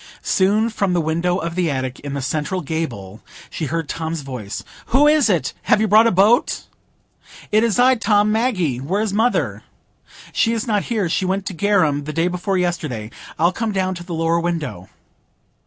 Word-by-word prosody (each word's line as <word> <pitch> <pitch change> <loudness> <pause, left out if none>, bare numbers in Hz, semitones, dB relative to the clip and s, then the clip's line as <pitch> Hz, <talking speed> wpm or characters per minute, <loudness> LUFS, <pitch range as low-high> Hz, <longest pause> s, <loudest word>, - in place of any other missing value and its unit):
Soon, 210 +4 +2
from 200 -4 0
the 175 - +2
window 170 +3 0
of 170 -3 -3
the 175 -2 0
attic 130 -2 -3
in 140 -1 -6
the 140 - -3
central 155 +6 -2
gable, 120 - -5 0.3
she 160 - -3
heard 165 +2 -2
Tom's 160 0 -4
voice,— 125 -7 -6 0.2
"Who 280 +5 +4
is 300 -5 +4
it? 180 -5 0 0.2
Have - - +5
you 220 - +2
brought 215 +3 +6
a - - +3
boat?" 205 +6 +3 0.9
"It 215 +1 +4
is 230 -2 +1
I, 255 +1 +5
Tom,—Maggie. 210 - +1
Where 185 +11 -1
is 210 -3 -2
mother?" 225 +4 +1 0.7
"She 230 - +2
is 225 -2 -2
not 210 -4 0
here; 215 -6 0
she 175 +3 0
went 190 +1 -1
to 195 - -4
Garum 165 -6 +1
the 155 - -5
day 165 +2 +1
before 180 +2 -1
yesterday. 155 -11 -2 0.3
I'll 170 +3 +2
come 225 +1 -2
down 190 -1 0
to 175 -1 -8
the 175 -1 -5
lower 165 +1 +1
window." 155 - -3
180 Hz, 190 wpm, -20 LUFS, 155-210 Hz, 0.9 s, brought